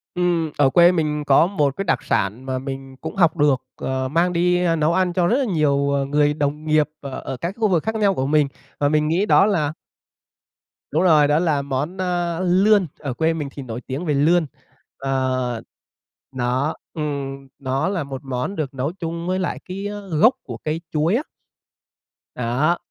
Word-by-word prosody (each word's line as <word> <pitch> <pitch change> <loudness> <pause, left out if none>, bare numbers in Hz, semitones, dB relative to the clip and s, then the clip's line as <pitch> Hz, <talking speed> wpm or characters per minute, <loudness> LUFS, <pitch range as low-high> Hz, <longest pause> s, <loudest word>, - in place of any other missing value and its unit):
Ừm. 175 -3 +1
Ở 140 -2 +4
quê 175 +4 +6
mình 150 -4 -1
có 145 +4 +5
một 145 -8 0
cái 195 - -1
đặc - - 0
sản 105 +6 -1
mà 130 -1 -2
mình 135 0 -7
cũng - - -6
học 170 -3 +3
được, 145 -3 +3
ờ, 130 0 -2
mang 170 +5 +1
đi 180 +1 +2 0.2
nấu 155 +2 +2
ăn 185 -1 +1
cho 175 -1 +2
rất 240 +7 +3
là 275 - +1
nhiều 155 -8 +2 0.3
người 145 0 +3
đồng 150 +1 -2
nghiệp 155 -1 +2
ở 140 -2 -6
ở 130 - -5
các 170 +7 -4
khu 220 -2 +2
vực 175 -5 +1
khác 220 0 -2
nhau 205 -2 +3
của 130 -7 -1
mình 145 0 +3 0.3
mà 145 - +2
mình 150 0 +2
nghĩ 175 +6 +1
đó 200 - +5
là 155 -8 0 1.2
Đúng 160 +5 +2
rồi, 155 -5 +5
đó 150 +2 +3
là 155 -5 +1
món, 140 +6 -3
a, 175 -2 -1
lươn. 190 +1 +4
Ở 140 -3 -4
quê 160 +6 +1
mình 150 -3 -3
thì 140 - -8
nổi 120 0 -6
tiếng 140 +7 -4
về 150 - +1
lươn. 160 +4 +3 0.5
Ờ, 130 -3 -1 0.7
nó 130 +4 -1 0.2
ừm, 140 -3 -4
nó 135 +4 -1
là 185 -5 -1
một 135 -1 -7
món 130 +8 -3
được 145 -4 -3
nấu 135 +3 -2
chung 170 -2 -5
với 185 +1 0
lại 185 - -2
cái, 195 +2 -5
a, 205 0 -5 0.2
gốc 230 +10 +6
của - - -7
cây 155 +2 -3
chuối 160 +6 +1
á. 275 - 0 1.1
Đó. 130 +8 +1
155 Hz, 195 wpm, -21 LUFS, 135-175 Hz, 1.2 s, quê